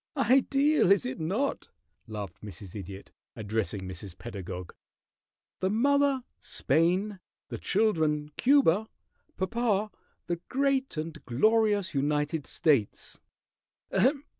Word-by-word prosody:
"Ideal 275 - +3
is 200 - +4
it 130 +1 -4
not?" 200 - -1 0.4
laughed 105 -5 -7
Mrs. 95 -2 -9
Idiot, 100 -1 -8 0.2
addressing 105 -3 -2
Mrs. 95 0 -7
Pedagog. 95 -5 -7 0.9
"The 190 - +1
mother, 275 +4 +2 0.2
Spain. 185 +5 +1 0.3
The - - -5
children, 155 -8 +1
Cuba. 220 - +4 0.5
Papa, 215 0 0 0.3
the 175 - -2
great 270 - 0
and 155 -1 -5
glorious 205 - +2
United 150 +2 0
States!" 140 -10 0
165 Hz, 95 wpm, -28 LUFS, -, 0.9 s, is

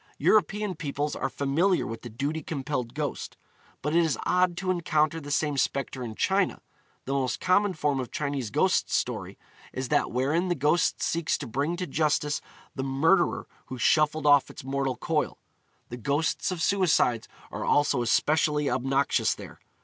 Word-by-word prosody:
European 210 -1 +2
peoples 145 -2 -3
are - - -2
familiar 145 +9 +1
with 115 -1 -6
the 120 - -8
duty 145 +8 -3
compelled 135 -5 -4
ghost; 150 -1 -4 0.5
but 150 +3 -1
it 170 - +5
is 160 -3 0
odd 180 -1 +2
to 185 0 -1
encounter 165 -3 +1
the 145 - -8
same 145 0 0
spectre 135 0 -1
in 110 -2 -6
China. 190 - +1 0.5
The 135 - -2
most 135 -2 -1
common 195 +2 +2
form 145 -3 0
of 125 - -4
Chinese 140 -6 -3
ghost - - +2
story - - -2 0.3
is 130 -1 -4
that - - +2
wherein 145 +9 0
the 175 - 0
ghost 150 +3 +1
seeks 165 -1 0
to 145 - -6
bring 140 +8 -1
to 180 - -2
justice 150 -1 0 0.3
the 130 - -4
murderer 160 +7 +2 0.2
who 130 - -6
shuffled 155 +4 +2
off 145 -2 +5
its - - -10
mortal 135 -1 -1
coil. - - -1 0.5
The 120 - -6
ghosts 140 +6 0
of 180 -3 -3
suicides 160 - +2 0.2
are - - -4
also 145 -3 +2
especially 150 +4 +2
obnoxious 135 +2 +1
there. - - -11
145 Hz, 165 wpm, -27 LUFS, 135-165 Hz, 0.5 s, it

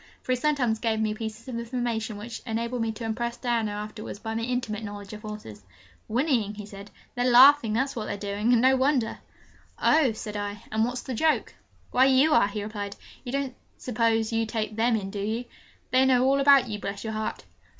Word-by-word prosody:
For - - -3
he - - +4
sometimes 250 -5 +1
gave 220 -2 0
me 215 -1 0
pieces 220 +2 -7
of 240 -2 -4
information 235 -3 -3
which 225 +2 -7
enabled 235 +2 -2
me 225 -1 0
to 230 - -8
impress 235 +2 -2
Diana 235 -3 0
afterwards 210 +1 -6
by 225 +1 -5
my 225 - -2
intimate 230 -3 -2
knowledge 205 -1 -7
of 210 - -8
horses. 210 - -8 0.5
'Whinnying?' 235 -4 0
he 210 0 -7
said. 200 0 -11 0.2
'They're 245 0 +1
laughing, 250 -2 +7
that's 270 +5 0
what 220 -3 -3
they're - - -3
doing 205 +3 -1
and 240 -1 +4
no 260 +1 +6
wonder!' 260 -3 +1 0.6
'Oh!' 300 -5 +4
said 215 -1 -7
I, 205 0 -4
'and 220 +1 +2
what's 245 +1 -4
the 260 - -5
joke?' 315 +6 +1 0.4
'Why, 255 +1 +5
you 270 +3 +4
are!' 200 - +5
he 205 0 -4
replied. 205 -1 -5 0.3
'You 245 - -6
don't 275 -2 -2 0.2
suppose 225 -2 0
you 225 0 +1
take 215 -1 -3
them 230 +1 +2
in, 195 -3 -3
do 205 - -5
you? 220 +4 -2 0.5
They 255 +1 +5
know 255 -1 +4
all 275 +1 +3
about 275 -2 +6
you, 210 -2 -4
bless 200 0 -5
your 220 -1 -4
heart!' 215 0 -3
225 Hz, 210 wpm, -26 LUFS, 215-250 Hz, 0.6 s, laughing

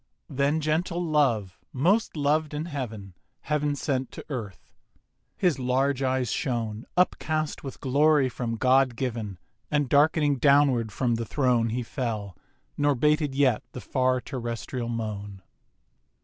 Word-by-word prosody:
Then 140 +3 +1
gentle 170 +3 0
Love, 120 - +1
most 180 - +1
loved 150 +1 +1
in 150 +2 -3
heaven, 110 - -6 0.3
Heav'n 150 -1 0
sent 135 -2 -2
to - - -9
Earth. 110 - -7 0.6
His 175 -8 +1
large 130 +2 +1
eyes 130 -3 0
shone, 115 -5 -2
Upcast 155 -4 0
with 135 - -7
glory 145 +1 +3
from 120 -2 -3
God 130 +1 +3
given, 115 -6 -3 0.3
And 145 -2 +1
darkening 145 +1 +3
downward 140 -5 +3
from 120 +3 0
the 115 0 -1
Throne 125 -5 +2
He 120 +2 -2
fell: 110 -7 -4 0.4
nor 145 -1 +2
bated 150 +1 +1
yet 135 -5 +3
the - - -6
far 130 0 +1
terrestrial 120 -1 -5
moan. 105 -4 -5
130 Hz, 135 wpm, -26 LUFS, 115-150 Hz, 0.6 s, glory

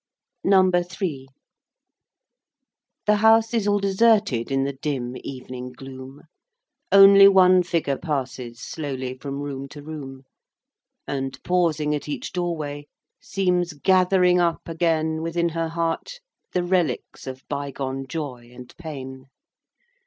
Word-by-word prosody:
NUMBER 185 -2 +4
THREE. 175 -7 -5
I. - - -34 1.7
The 210 - +4
House 225 +1 +4
is 220 -3 +1
all 205 0 +3
deserted 200 - +2
In 135 0 +1
the 140 +1 -2
dim 130 -3 -4
evening 125 -1 -8
gloom, 130 +1 -11 0.7
Only 195 0 +9
one 185 -2 +6
figure 165 -6 -1
passes 130 -6 -4
Slowly 130 -3 -5
from 140 0 -5
room 140 -1 -5
to 145 +1 -11
room; 140 -4 -8 0.8
And, 135 -1 -3
pausing 160 -4 +1
at 150 0 -4
each 145 - -4
doorway, 155 -5 -3 0.3
Seems 180 -3 0
gathering 180 +2 +3
up 170 -2 0
again 160 -1 0
Within 170 +1 0
her 165 0 -2
heart 170 - -3 0.3
the 180 - 0
relics 175 -9 -1
Of 130 0 -8
bygone 135 -2 -4
joy 130 -5 -6
and 125 0 -13
pain. 135 -5 -8
155 Hz, 125 wpm, -23 LUFS, 135-180 Hz, 1.7 s, Only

